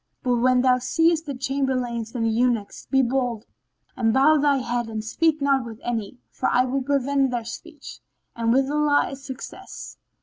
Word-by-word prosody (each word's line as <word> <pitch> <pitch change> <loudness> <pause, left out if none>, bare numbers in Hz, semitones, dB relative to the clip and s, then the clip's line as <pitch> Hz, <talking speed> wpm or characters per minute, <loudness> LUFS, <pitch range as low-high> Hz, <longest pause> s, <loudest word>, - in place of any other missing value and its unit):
But 250 -2 +1
when 250 +1 +3
thou 255 -1 +4
seest 325 +4 +1
the 280 - -4
Chamberlains 255 -3 -2
and 230 -2 0
the - - +2
Eunuchs 230 -2 -1
be 270 0 +3
bold, 245 -3 -1 0.5
and 225 -1 +1
bow 280 +6 +5
thy 285 -1 +3
head 240 -2 -2
and 220 -1 -4
speak 310 +7 +1
not 275 -2 +2
with 230 -2 -9
any, 230 -1 -3
for - - -1
I 250 - +3
will 265 +2 -1
prevent 275 0 +1
their 240 -2 -3
speech; 305 +4 -9 0.4
and 230 0 0
with 265 +2 +3
Allah 295 -1 +2
is 275 0 -9
success!" 265 -2 -9
255 Hz, 180 wpm, -24 LUFS, 235-280 Hz, 0.5 s, bow